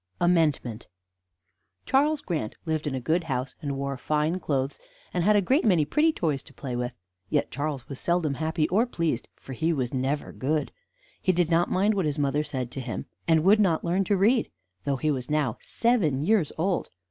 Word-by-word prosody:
AMENDMENT 155 -10 +1 1.0
Charles 290 +2 +2
Grant 150 - -3
lived 155 -2 -1
in 135 - -1
a - - -1
good 160 +6 0
house, 130 -3 -2
and 140 -2 -3
wore 140 0 -3
fine 155 +6 0
clothes, 140 -4 -1 0.3
and 175 - +1
had 210 +3 +4
a 205 - +4
great 270 - +3
many 180 -9 +4
pretty 305 - +3
toys 155 - -1
to - - -17
play 130 -3 -5
with; 125 0 -2 0.4
yet - - 0
Charles 145 -3 -3
was 140 - -6
seldom 170 -4 +1
happy 155 +2 0
or 220 +7 +3
pleased; 165 - -1
for 135 - -10
he 160 +7 0
was 130 -6 -1
never 135 +3 -1
good. 150 +3 -1 0.5
He 185 - +3
did 175 -2 +1
not 170 +1 +3
mind 200 +4 +2
what 195 -4 0
his 150 -1 -1
mother 145 +1 +1
said 130 -5 -4
to 135 - -5
him, 120 -3 -5 0.2
and 160 -2 +4
would 205 +4 +6
not 180 -6 +2
learn 180 +3 +2
to 200 +2 +2
read, 225 +5 +3 0.4
though 140 - +1
he 155 +4 +1
was 130 -3 -3
now 150 -7 0
seven 165 - +1
years 200 -6 +3
old. 180 +3 0
155 Hz, 200 wpm, -27 LUFS, 140-180 Hz, 1.0 s, would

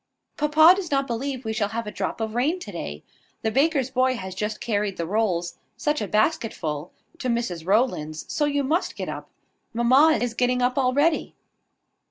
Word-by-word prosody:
Papa 310 +3 +6
does 375 -4 -4
not 275 -1 +1
believe 260 +1 -4
we 220 - -2
shall 210 -2 0
have 230 +1 -4
a 210 - -5
drop - - -3
of 220 -1 -3
rain 275 +9 +1
to 205 - -7
day. 75 - -6 0.4
The 220 - +1
baker's 275 0 +2
boy 255 0 +2
has 190 -5 -6
just 210 +3 -3
carried 205 -3 -1
the 170 - -2
rolls, 180 -3 -1 0.2
such 300 -2 0
a 210 - -2
basket 220 - +1
full! 150 0 -4 0.3
to 255 - -3
Mrs 205 -9 -2
Rowland's: 190 -8 0
so 295 - 0
you 285 -1 0
must 315 +7 0
get - - -5
up. - - -7 0.5
Mamma 265 +7 +5
is 245 -2 -2
getting 250 +1 +1
up 250 0 +1
already." 285 +5 +1
240 Hz, 190 wpm, -24 LUFS, 210-275 Hz, 0.5 s, Papa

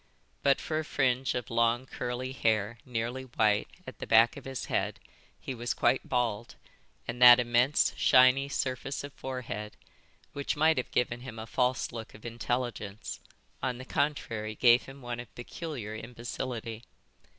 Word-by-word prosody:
But 140 -1 +3
for 155 -1 -2
a - - -2
fringe 130 -3 +1
of 120 -3 -4
long 115 +2 +2
curly 125 0 -4
hair, 110 -3 0
nearly 125 +2 -3
white, 110 -4 +2 0.2
at - - -10
the - - -6
back 115 +1 +6
of - - -10
his 135 -1 -4
head, - - -1 0.4
he 135 - -5
was 120 0 -3
quite 130 - +1
bald; 120 -3 -1 0.5
and 120 +2 -5
that 125 0 +10
immense, 120 +4 +3
shiny 130 +2 +5
surface 135 0 -2
of 140 -1 -8
forehead, 115 -5 -6 0.6
which 140 0 -2
might 160 +1 +4
have 130 - -2
given 120 -1 0
him 120 -2 -9
a 110 - -6
false 125 +2 0
look 115 -2 -8
of 105 - -14
intelligence, 115 -2 -3 0.4
on 125 -1 -1
the 130 - -8
contrary 115 -7 -2
gave 120 +2 +5
him 135 0 -11
one 120 0 -4
of 115 -5 -10
peculiar 120 -3 -6
imbecility. 115 0 -5
120 Hz, 160 wpm, -30 LUFS, 115-130 Hz, 0.6 s, that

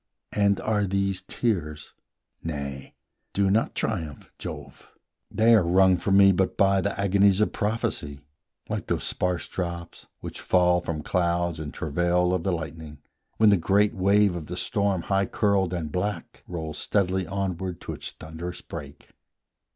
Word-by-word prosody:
And 100 -1 +2
are 105 -2 +1
these 100 0 0
tears? 75 -10 -2 0.5
Nay, 70 -4 -5 0.4
do 100 -1 +2
not 110 +3 +1
triumph, 75 -3 -3
Jove, - - -9 0.3
They 115 +1 +4
are 110 - +6
wrung 95 +2 +4
from 95 +2 +2
me 100 0 +8
but 95 0 0
by 100 -1 +4
the 100 +2 -2
agonies 100 0 +4
Of 105 - +1
prophecy, 100 -9 -2 0.5
like - - -4
those - - -1
sparse 90 -2 -1
drops 85 -2 -5
which - - -7
fall 90 -1 +3
From 80 -3 -4
clouds 85 -2 0
in 75 -2 -5
travail 85 +3 +1
of 90 - 0
the 95 - 0
lightning, 80 -2 -6 0.4
when 110 -1 +6
The 100 - +5
great 100 +5 +2
wave 100 -1 +3
of 80 -3 -6
the 90 - -5
storm 100 -6 0
high 95 -1 +1
curled 100 -4 +1
and 85 -4 -3
black 100 +5 -3
Rolls 80 -3 -5
steadily 95 -3 0
onward 95 -2 -3
to - - -5
its - - -6
thunderous 80 +3 -8
break. - - -9
90 Hz, 155 wpm, -26 LUFS, 85-100 Hz, 0.5 s, me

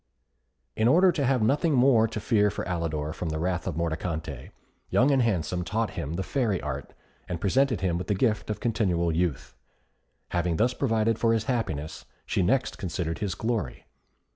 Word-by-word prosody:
In 110 - +2
order 180 +7 +6
to 145 -5 -1
have 130 -4 +2
nothing 145 +7 +2
more 120 -3 +5
to 110 - -5
fear 105 -1 +2
for - - -5
Alidor 80 -4 -2
from 85 - -4
the 80 - -2
wrath 90 +2 -2
of - - -2
Mordicante, 80 -4 -3 0.4
Young 135 +4 +4
and 135 -2 +3
Handsome 90 -5 0
taught 110 +6 -1
him 75 +3 -4
the 95 - -2
Fairy 115 -6 0
Art, 70 -2 -5 0.4
and 90 -2 -3
presented 125 +6 +2
him 85 -2 0
with 90 - -5
the 105 - +1
gift 105 +1 0
of 105 - -2
continual 95 -7 +1
youth. 85 -6 -1 0.8
Having 85 -1 0
thus 120 +7 +2
provided 115 -4 +1
for 115 -1 +3
his 110 -1 +1
happiness, 80 - -3 0.2
she - - 0
next 125 +9 +1
considered 85 -2 -3
his 100 -5 -2
glory. 110 - -3
100 Hz, 180 wpm, -27 LUFS, 85-115 Hz, 0.8 s, order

